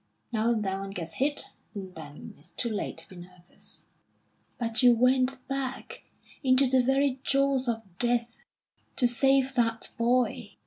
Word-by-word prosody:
Now 225 +1 +2
and 225 -3 +1
then 190 0 -1
one 195 0 -5
gets 175 -4 -5
hit, 290 +2 0 0.2
and 190 -2 -7
then 155 -3 -9
it's 145 - -14
too 235 - -2
late 210 - -3
to - - -5
be 185 - -12
nervous." 175 0 -11 0.7
"But 230 -1 0
you 245 -2 +7
went 255 +2 +2
back 270 -1 -4 0.4
into 260 +1 +5
the 260 0 +4
very 270 +1 +2
jaws 275 -1 +2
of 225 -1 -1 0.2
death 240 -1 +2 0.7
to 250 - +3
save 270 +2 +3
that 230 -2 0
boy." 245 +1 +1
245 Hz, 155 wpm, -28 LUFS, 215-265 Hz, 0.7 s, you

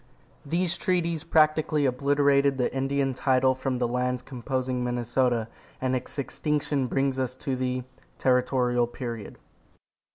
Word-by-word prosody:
These 170 +3 0
treaties 170 -4 0
practically 155 -2 +3
obliterated 140 +1 +3
the 125 - 0
Indian 135 0 0
title 130 0 +3
from 130 0 -2
the 125 -1 0
lands 125 +1 -1
composing 130 0 -2
Minnesota, 120 -1 0 0.3
and 130 0 0
its 130 +3 -5
extinction 145 -1 -1
brings 135 +1 0
us 130 -1 -1
to 130 0 -3
the 125 0 -2 0.3
TERRITORIAL 125 -1 +2
PERIOD. 120 -3 -6
130 Hz, 125 wpm, -27 LUFS, 125-140 Hz, 0.3 s, practically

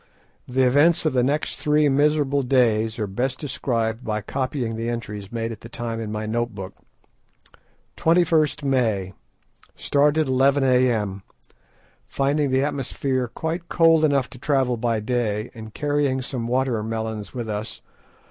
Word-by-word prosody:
The 130 +1 +2
events 155 +7 +4
of 155 - +2
the 125 - +3
next 145 +5 -1
three 150 0 +2
miserable 145 0 +2
days 115 -4 +2
are 110 - -1
best 125 +7 -2
described 115 -5 -2
by 110 -1 -2
copying 130 -2 -3
the 115 +1 -3
entries 105 -4 -5
made 115 -1 -3
at 110 - -9
the 115 - -10
time 115 -1 -4
in 110 -2 -5
my 110 0 -3
note 120 0 -2
book. 95 -1 -7 1.2
"21st 160 -3 +2
May.—Started 135 - -1
11 135 +2 +3
a.m., 120 -7 +2 0.9
finding 140 +1 0
the 130 +1 +2
atmosphere 135 -2 -1
quite 160 +8 -4
cold 165 -2 +4
enough 140 -4 +2
to 130 - -12
travel 135 -3 +1
by 115 -1 0
day, 110 -1 -2
and 110 -2 -10
carrying 145 -3 0
some 125 -3 -4
water 125 -2 0
melons 110 0 -4
with 120 -2 -4
us. 105 +1 -5
125 Hz, 145 wpm, -23 LUFS, 110-140 Hz, 1.2 s, events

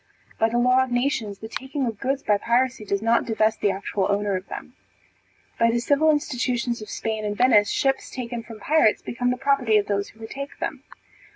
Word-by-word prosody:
By 225 - +3
the 240 - -1
law 250 +2 +4
of 260 - -5
nations, 245 -5 -1
the 220 - -8
taking 265 +4 -3
of 225 -4 -4
goods 270 +1 -1
by 205 -1 +2
piracy 245 0 +1
does 200 +1 -1
not 230 +1 +3
divest 220 -1 0
the 205 - +3
actual 195 0 -1
owner 200 -1 0
of 185 +1 -5
them. - - -8 0.9
By 230 - +4
the 235 - +1
civil 285 +6 +3
institutions 245 -5 0
of 215 - -9
Spain 220 -1 -3
and 205 -1 -3
Venice, 225 -5 +5
ships 270 -1 0
taken 240 -2 -5
from 225 -1 -11
pirates 295 -4 +3
became 245 +1 -1
the 250 - 0
property 265 -5 +2
of 205 - +1
those 200 0 -1
who 220 - -20
retake 275 +6 -7
them. - - -4
235 Hz, 205 wpm, -24 LUFS, 215-260 Hz, 0.9 s, Venice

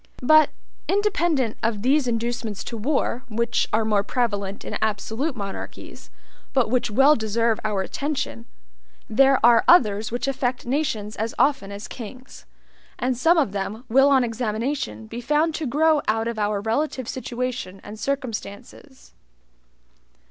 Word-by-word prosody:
But, 310 +3 +6 0.4
independent 345 - +1
of 220 -2 -1
these 275 +1 +3
inducements 230 -2 -2
to 235 - -6
war, 250 +1 -1
which 235 +2 0
are 220 0 +1
more 210 -2 +2
prevalent 205 -3 -2
in - - -4
absolute 220 +7 -1
monarchies, 200 -3 -8 0.4
but 255 -5 +2
which 250 -3 +1
well 270 +7 +5
deserve 230 0 0
our 205 -3 0
attention, 265 - -4 0.6
there 270 +4 +4
are 235 -1 +6
others 215 - +4
which 245 +3 -2
affect 260 -2 -1
nations 240 -6 -2
as 220 +2 -3
often 270 -9 +2
as 200 +1 -7
kings; 255 +3 -10 0.5
and 250 0 0
some 325 +8 +3
of 285 -11 +2
them 205 +3 -4
will 270 +4 +5
on 270 -2 +4
examination 225 - -3
be 235 - -7
found 300 +5 +1
to 310 -2 -3
grow 305 +3 +3
out 225 +1 +1
of 235 -2 -3
our 205 -1 0
relative 255 +3 -1
situation 250 -6 -4
and 210 +1 -9
circumstances. 260 0 -6
240 Hz, 140 wpm, -23 LUFS, 215-275 Hz, 0.6 s, But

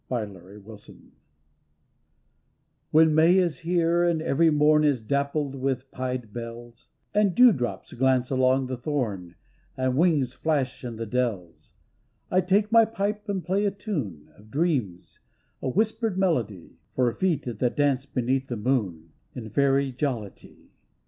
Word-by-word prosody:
257 100 -4 -6
CEOL 110 -1 -10
SIDHEi 105 - -17 1.8
When 160 0 +5
May 165 +4 +5
is 175 -4 +1
here, 170 0 +1
and 170 -2 +1
every 160 +1 +2
mom 150 0 +4
Is 145 -4 +2
dappled 140 +4 -1
with 135 -1 -3
pied 125 -4 -4
bells, 120 0 -9 0.3
And 205 -3 +2
dewdrops 205 - +3
glance 130 0 +1
along 130 0 +2
the 130 0 -4
thorn 110 - -3 0.4
And 130 -1 0
wings 145 -5 +2
flash 140 -6 -2
in 120 -2 -5
the 115 +1 -5
dells, 110 -8 -3 0.6
I 185 - +3
take 200 +4 +1
my 230 0 +7
pipe 210 0 -3
and 190 -3 -2
play 190 +3 0
a - - +3
tune 150 - -5
Of 105 +2 -19
dreams, 130 - -2 0.4
a 135 - -2
whispered 220 - 0
melody, 120 - -2 0.2
For 125 -2 +1
feet 185 -6 0 0.2
that 125 -1 0
dance 140 -2 +1
beneath 130 +1 -1
the 120 - -4
moon 100 -9 -2 0.2
In 110 -4 -7
fairy 140 -1 +2
jollity. 125 -6 -6
135 Hz, 140 wpm, -25 LUFS, 120-170 Hz, 1.8 s, my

